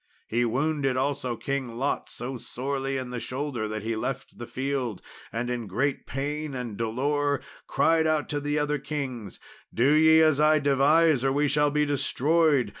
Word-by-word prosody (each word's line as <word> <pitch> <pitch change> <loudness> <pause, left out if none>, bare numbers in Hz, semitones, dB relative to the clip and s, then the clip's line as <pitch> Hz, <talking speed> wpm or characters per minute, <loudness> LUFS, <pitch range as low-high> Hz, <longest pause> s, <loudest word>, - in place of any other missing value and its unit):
He 120 +2 +1
wounded 135 +2 0
also 130 -2 -1
King 130 -2 -3
Lot 135 +3 -1
so 130 +2 -5
sorely 135 +3 -3
in 130 -1 -5
the 125 - -3
shoulder 125 -3 -3
that 110 -1 -5
he 115 +1 -2
left 135 +4 -5
the 120 - -6
field, 130 -5 -2 0.3
and 115 +2 -2
in 120 -3 -3
great 135 +9 -1
pain 145 +1 -3
and 120 -4 -5
dolour 140 +6 0 0.3
cried 160 -1 +3
out 155 -2 +1
to 145 - -1
the 145 +1 -1
other 150 0 0
kings, 130 -7 -5 0.3
"Do 125 +5 +3
ye 160 +1 +6
as 155 -3 +4
I 155 0 +5
devise, 145 +1 +3
or 135 - +2
we 145 +2 +2
shall 145 +1 +2
be 150 +1 +1
destroyed. 145 -2 +2
135 Hz, 175 wpm, -26 LUFS, 125-150 Hz, 0.3 s, ye